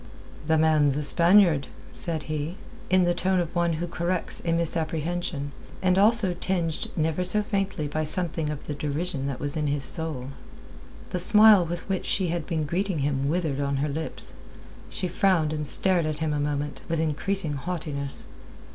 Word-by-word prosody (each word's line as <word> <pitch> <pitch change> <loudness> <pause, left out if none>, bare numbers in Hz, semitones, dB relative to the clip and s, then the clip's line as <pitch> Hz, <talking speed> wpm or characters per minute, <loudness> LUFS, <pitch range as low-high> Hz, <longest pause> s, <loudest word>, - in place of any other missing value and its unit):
"The 160 0 +3
man's 155 -3 +3
a 150 - -2
Spaniard," 170 -2 +4 0.2
said 160 -3 -4
he, 155 +3 -4 0.3
in 185 0 +4
the 175 0 +2
tone 185 +1 0
of 170 -1 -3
one 170 -1 +1
who 165 +2 -3
corrects 175 +1 -2
a 170 - -1
misapprehension, 165 -2 -2 0.3
and 185 -1 +2
also 205 -1 +5
tinged 175 -3 -2
never 160 +2 0
so 210 +4 +3
faintly 195 -7 -2
by 155 +2 -2
something 165 -1 -2
of 150 -1 -6
the 150 - -4
derision 145 0 -3
that 135 -3 -4
was 145 -1 -4
in 150 -1 -1
his 140 -1 +1
soul. 150 -5 +1 0.8
The 180 - -2
smile 210 -1 +6
with 175 +1 -5
which 190 -2 -2
she 185 -3 0
had 170 -2 -3
been 160 -2 -1
greeting 185 +4 -1
him 140 -1 -1
withered 160 -4 -1
on 140 0 -1
her 145 +2 -1
lips. 160 +3 -5 0.6
She 185 - -3
frowned 180 -5 +1
and 150 -1 -1
stared 180 0 +3
at 155 -1 -3
him 155 -1 -1
a 145 - -1
moment, 145 0 -3
with 165 -1 0
increasing 160 +2 0
haughtiness. 145 -2 -4
160 Hz, 175 wpm, -26 LUFS, 150-180 Hz, 0.8 s, smile